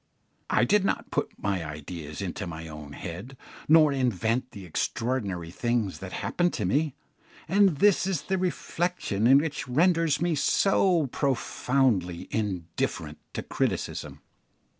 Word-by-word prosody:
I - - +3
did 210 -1 +3
not - - -1
put - - 0
my 95 -4 -1
ideas 75 +2 -6
into 95 +1 -4
my 80 -1 -6
own 75 -2 -9
head, 95 - -7 0.3
nor 155 -2 +6
invent 125 -1 0
the 100 -5 -10
extraordinary 95 -2 -2
things 115 -1 -1
that 95 -1 -7
happen 175 0 0
to 105 - -1
me, 145 - +1 0.5
and 190 -2 +4
this 195 0 +4
is 185 -6 -1
the 190 -1 -1
reflection 165 - +1
which 150 -2 -1
renders 165 +2 +3
me 175 0 +1
so 175 +2 +3
profoundly 125 - 0
indifferent 85 -6 -2 0.2
to - - -3
criticism. - - -2
125 Hz, 130 wpm, -27 LUFS, -, 0.5 s, nor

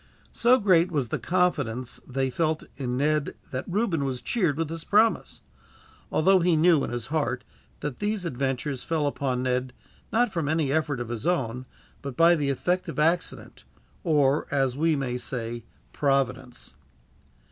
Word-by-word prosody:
So 245 +2 +4
great 185 -6 +4
was 140 -7 -1
the - - -2
confidence 145 -10 -1
which 130 - -14
they 135 -1 +1
felt 160 +2 0
in 125 -3 -3
Ned 150 +1 0 0.2
that 130 -1 -3
Reuben 185 -6 0
was 130 -3 -3
cheered 175 - 0
with 165 -1 -1
this 165 0 -6
promise; 220 +2 +2 0.7
although 190 +4 +4
he 175 -1 +3
knew, 160 -2 +4
in - - -2
his 120 -1 -4
heart, 155 -2 0 0.4
that 145 -4 -4
these 205 -2 -1
adventures 135 -2 -2
fell 160 -3 0
upon 130 -3 -1
Ned 125 0 -1 0.4
not 240 -1 +2
from 160 -4 -1
any 155 -3 +1
effort 145 -3 0
of 120 -1 -5
his 120 +5 -4
own, 130 -7 -1 0.3
but 140 -3 -7
by 170 +1 +6
the 145 -4 0
effect 180 +6 -1
of 155 - -6
accident; 165 +3 -1 0.4
or, 150 -4 +2
as 135 -3 +1
we 160 +2 +2
may 125 -3 -2
say, 120 -2 -3 0.3
Providence. 130 - -1
145 Hz, 165 wpm, -26 LUFS, 130-170 Hz, 0.7 s, by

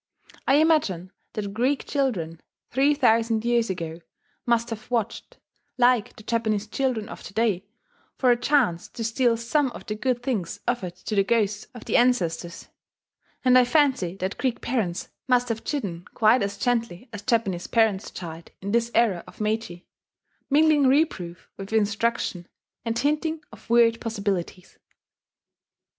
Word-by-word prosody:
I 270 - +5
imagine 285 - +2 0.2
that 200 -2 -4
Greek 255 +6 0
children, 185 - -1 0.3
three 275 +3 +3
thousand 230 -4 +2
years 235 -2 +2
ago, 170 -2 -4 0.5
must 235 0 +1
have 220 0 -7
watched, 235 -4 -2 0.4
like 245 -3 +3
the 215 - -13
Japanese 220 -2 0
children 225 -1 -1
of - - -9
to 200 - -11
day, 205 -4 +1 0.5
for 255 -2 +4
a - - +5
chance 240 - +1
to 230 - -7
steal 230 +1 +2
some 265 +5 +1
of - - -10
the 210 - -3
good 245 +2 -1
things 215 -10 -2
offered 225 -8 -1
to 200 - -6
the 200 -1 +4
ghosts 210 -1 0
of 240 - -10
the - - +2
ancestors; 180 -9 0 0.8
and 255 0 +6
I - - +6
fancy 250 - +2
that 190 +1 -4
Greek 255 -3 0
parents 210 -8 -2 0.2
must 245 -1 +3
have 225 -1 -3
chidden 190 - -3
quite 225 +3 +4
as 200 0 -2
gently 230 -2 -1
as 205 - -6
Japanese 205 -6 0
parents 220 -4 +2
chide 165 -2 -8
in 200 +1 -4
this 235 +1 +2
era 210 -7 +3
of - - -15
Meiji, 215 -5 -2 0.6
mingling 295 -1 +5
reproof 260 - 0
with 195 +1 -8
instruction, 215 -4 0 0.4
and 230 0 -2
hinting 305 +4 0
of - - -15
weird 230 -1 +4
possibilities. 200 -5 -3
230 Hz, 150 wpm, -25 LUFS, 195-250 Hz, 0.8 s, and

